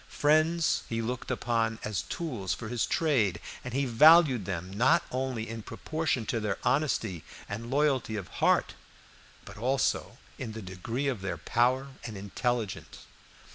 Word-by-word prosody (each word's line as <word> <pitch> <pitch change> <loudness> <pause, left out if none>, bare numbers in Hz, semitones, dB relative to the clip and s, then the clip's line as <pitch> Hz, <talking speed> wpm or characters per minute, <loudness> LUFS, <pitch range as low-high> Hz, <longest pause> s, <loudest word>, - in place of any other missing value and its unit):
Friends 155 +2 +2
he 115 - -1
looked 120 +2 -3
upon 115 -2 0
as 105 -5 -1
tools 120 - -3
for 110 - -7
his 120 -1 0
trade, 115 - +1 0.2
and 125 - -6
he 135 +3 0
valued 140 - +6
them 90 -1 -4
not 135 +11 +4
only 130 -3 -2
in 115 0 -6
proportion 155 0 -2
to 115 - -1
their 105 -2 -2
honesty 110 - 0 0.2
and 110 +3 -5
loyalty 135 -5 +1
of 100 -4 -4
heart, - - +3 0.7
but - - -11
also 130 +4 0 0.2
in 115 -4 -5
the 110 - -6
degree 115 +9 -3
of 125 -8 -1
their 90 -3 -3
power 125 - +1
and 110 -4 -6
intelligence. 110 +2 -3
120 Hz, 150 wpm, -29 LUFS, 105-135 Hz, 0.7 s, valued